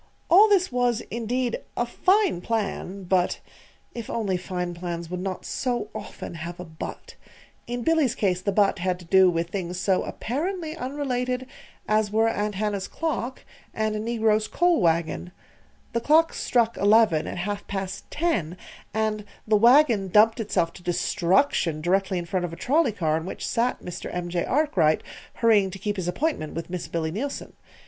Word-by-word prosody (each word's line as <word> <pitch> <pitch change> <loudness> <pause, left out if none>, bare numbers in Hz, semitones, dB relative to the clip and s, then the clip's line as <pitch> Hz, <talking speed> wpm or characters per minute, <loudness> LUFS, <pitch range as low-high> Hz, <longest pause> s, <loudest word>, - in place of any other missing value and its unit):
All 410 +5 +8
this 375 -5 +3
was, 245 -2 +1
indeed, 240 +2 -1 0.2
a 240 - +1
fine 370 - +2
plan; 200 -3 -3
but 180 0 +1 0.5
(If 235 -3 -7
only 205 -5 -1
fine 180 -1 -3
plans 170 -1 -5
would 180 - -3
not 185 0 -4
so 240 -5 -2
often 210 -4 -7
have 170 +2 -7
a 180 - -6
"but"!) 160 -1 -8 0.5
In 245 0 -3
Billy's 310 -6 +2
case 185 -3 0
the 200 - 0
"but" 200 -1 +2
had 180 0 0
to 180 - -13
do 190 +2 +6
with 170 0 -2
things 180 -2 -3
so 190 0 +2
apparently 320 - -3
unrelated 255 -3 -2 0.4
as 215 -1 +2
were 220 +2 +2
Aunt 210 -2 -1
Hannah's 205 -1 -2
clock 285 -6 -3 0.3
and 215 -1 0
a - - -2
negro's 220 -1 +1
coal 350 -6 +2
wagon. 170 +1 0 0.6
The 235 - 0
clock 320 +5 +4
struck 235 -2 +1
eleven 205 -5 +4
at - - -5
half 200 +3 -3
past 195 0 -5
ten, 215 - -1 0.4
and 215 -1 0 0.2
the 215 - +4
wagon 235 -2 +5
dumped 215 +5 +5
itself 180 -6 0
to - - -12
destruction 175 - +1
directly 190 +3 +1
in 175 - -3
front 180 +1 -1
of 170 - -6
a - - -6
trolley 275 - +2
car 160 -5 0
in 165 +2 -5
which - - -5
sat 245 +1 0
Mr. 180 - -6
M. 175 0 -3
J. 175 0 -1
Arkwright, 200 - +2 0.3
hurrying 215 -4 +4
to 190 - -8
keep 205 +1 -2
his 180 -2 -3
appointment 180 - -2
with 165 +1 -5
Miss 180 -2 -4
Billy 160 -1 -2
Neilson. 270 - -4
205 Hz, 170 wpm, -25 LUFS, 180-245 Hz, 0.6 s, All